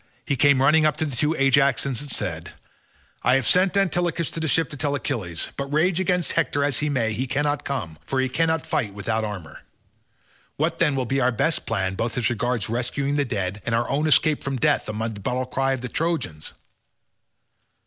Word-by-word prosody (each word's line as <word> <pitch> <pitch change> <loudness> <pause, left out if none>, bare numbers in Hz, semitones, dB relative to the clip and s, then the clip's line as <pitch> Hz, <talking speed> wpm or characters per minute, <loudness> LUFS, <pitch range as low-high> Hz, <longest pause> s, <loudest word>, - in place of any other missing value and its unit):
He 140 - 0
came 140 -1 +4
running 155 +3 +5
up 155 -1 +2
to 160 - 0
the 140 -4 -4
two 150 +6 +1
Ajaxes 135 -2 +2
and 145 - -7
said, - - -3 0.7
"I 125 - +3
have 135 -2 +1
sent 185 - +3
Antilochus 175 -4 0
to - - -4
the 160 - -1
ships 160 0 +1
to - - -6
tell 145 0 -1
Achilles, 105 - -3
but 140 0 -4
rage 165 +4 +2
against 180 -3 +1
Hector 145 - 0
as 140 -3 +1
he 150 - 0
may, 115 -6 0
he 130 +5 -2
cannot 145 +2 0
come, 85 - -4
for 135 - -1
he 130 - +2
cannot 160 +4 0
fight 105 -7 -2
without 110 +2 -1
armour. 95 -8 -6 1.0
What 165 +3 -1
then 150 -4 +3
will 130 -1 -1
be 135 +3 0
our 125 0 +3
best 155 +8 0
plan 95 -4 -1
both 115 +5 -3
as 120 -1 +1
regards 120 0 -1
rescuing 125 +5 -1
the 145 -1 +1
dead, 100 -4 -3
and 115 - 0
our 120 +1 0
own 150 +3 +1
escape 155 0 +3
from 135 -1 -2
death 150 -1 +1
amid 110 +1 -3
the 100 - -9
battle 125 +5 -1
cries 135 +1 0
of 130 - -8
the 125 - -4
Trojans?" 155 - -2
135 Hz, 210 wpm, -24 LUFS, 115-150 Hz, 1.0 s, running